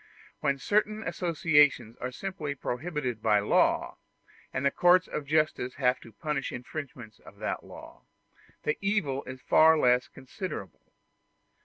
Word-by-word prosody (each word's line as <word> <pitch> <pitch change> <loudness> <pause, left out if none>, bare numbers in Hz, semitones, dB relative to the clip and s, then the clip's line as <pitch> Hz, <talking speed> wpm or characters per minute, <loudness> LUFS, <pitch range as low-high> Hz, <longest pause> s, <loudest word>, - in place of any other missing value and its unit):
When 140 0 0
certain 215 +8 0
associations 150 - +2
are 125 - -4
simply 155 -2 -5
prohibited 130 -3 -3
by 105 - +4
law, 100 0 +2 0.5
and 140 - -2
the 140 - +4
courts 180 +3 +4
of 145 - -5
justice 150 -4 0
have 130 -1 +1
to 115 - -14
punish 135 +4 -3
infringements 125 -4 -8
of - - -16
that - - -3
law, - - -12 0.6
the 150 - -1
evil 185 -10 0
is 130 0 -8
far 160 0 +6
less 125 -3 +3
considerable. 130 - -7
140 Hz, 135 wpm, -28 LUFS, 125-165 Hz, 0.6 s, far